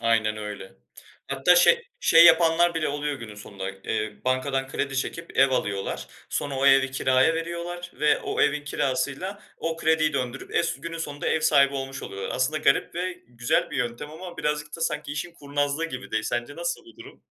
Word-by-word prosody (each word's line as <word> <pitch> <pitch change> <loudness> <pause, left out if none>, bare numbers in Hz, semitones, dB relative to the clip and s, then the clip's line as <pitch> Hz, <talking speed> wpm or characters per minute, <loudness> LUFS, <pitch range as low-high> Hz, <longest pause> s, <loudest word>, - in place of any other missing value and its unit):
Aynen 110 -2 +2
öyle. 105 -2 -7 0.6
Hatta 140 +6 +4
şey 475 - +5 0.2
şey 165 - +7
yapanlar 170 0 +5
bile 160 -1 0
oluyor 145 0 -2
günün 115 -5 -9
sonunda. 100 -2 -7
Eee, 105 +2 -3
bankadan 135 +1 0
kredi 135 0 -3
çekip, 165 +5 -4
ev 135 0 +6
alıyorlar. 100 -6 -2 0.2
Sonra 145 -1 -2
o 140 - +2
evi 135 -1 +5
kiraya 130 +3 +3
veriyorlar 170 +1 -5
ve 150 - +3
o - - -3
evin 150 0 +2
kirasıyla, 150 +9 -2 0.2
o 165 0 -2
krediyi 160 -1 +2
döndürüp, 130 -1 -4
es 170 - 0
günün 165 0 -6
sonunda 145 -3 -5
ev 160 - +1
sahibi 140 -3 +4
olmuş 135 0 -5
oluyorlar. 95 0 -5
Aslında 150 +5 +1
garip 140 -2 +2
ve 180 +1 -2 0.2
güzel 120 0 0
bir - - -4
yöntem 125 +3 -3
ama 175 +3 -9
birazcık 150 0 -2
da 165 - -12
sanki, 150 -3 -2
işin 160 +4 -4
kurnazlığı 145 +1 -1
gibi 130 -5 -6
de. 110 0 0
Sence 120 +4 -3
nasıl 170 - -3
bu 345 - -17
durum? 375 +5 -13
145 Hz, 185 wpm, -25 LUFS, 130-165 Hz, 0.6 s, şey